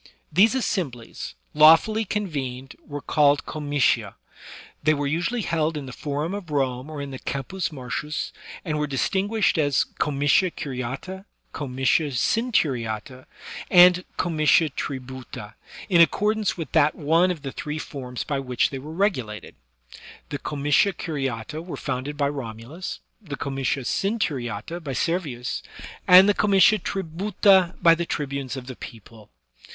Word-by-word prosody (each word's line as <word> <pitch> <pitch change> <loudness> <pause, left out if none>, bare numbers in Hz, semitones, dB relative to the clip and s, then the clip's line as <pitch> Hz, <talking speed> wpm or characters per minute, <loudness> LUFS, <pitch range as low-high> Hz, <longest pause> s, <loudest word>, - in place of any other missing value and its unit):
These 215 - +5
assemblies, 135 - -3 0.2
lawfully 165 +9 +6
convened, 140 -11 -4
were 145 -1 -7
called 145 -2 +3
comitia; 145 -3 0 0.7
they 155 +1 +3
were 145 0 -2
usually 175 +11 -1
held 160 -2 0
in 145 - -5
the 130 - -8
Forum 150 +6 -3
of 200 -5 -6
Rome 135 -1 -1
or 150 -2 -5
in 140 - -7
the 130 - -7
Campus 165 +7 -3
Martius^ 150 +1 -4 0.3
and 155 -3 -1
were 150 - 0
distinguished 195 - +1
as 145 -3 +3 0.2
comitia 145 +5 +2
curiata^ 140 +7 -6 0.3
comitia 135 +2 +1
centuriata^ 130 - -1 0.4
and 180 0 +7
comitia 155 -2 +3
tributa^ 130 -5 -7 0.3
in 175 -5 +5
accordance 210 +6 +2
with 160 -6 -5
that 150 +1 +3
one 165 +4 +3
of 165 -5 -4
the 135 - -4
three 150 +3 -5
forms 130 -5 -6
by 140 -2 -2
which 125 -3 0
they 135 - -5
were 150 +4 -9
regulated. 145 - -2 0.8
The 145 - -4
comitia 150 +8 +1
curiata 140 -3 -4
were 175 - -7
founded 140 +2 -4
by 140 -1 +1
Romulus, 135 - -7 0.2
the 150 -9 -7
comitia 135 -1 -2
centuriata 155 - -2
by 140 -3 -4
Servius, 140 -5 -2 0.5
and 185 +2 +9
the 205 - +5
comitia 200 +1 +4
tributa 190 +1 +2
by 165 -1 +8
the 170 +1 -2
tribunes 140 -2 -3
of 130 - -7
the 130 -1 -8
people. 110 -1 -12
150 Hz, 135 wpm, -24 LUFS, 135-175 Hz, 0.8 s, and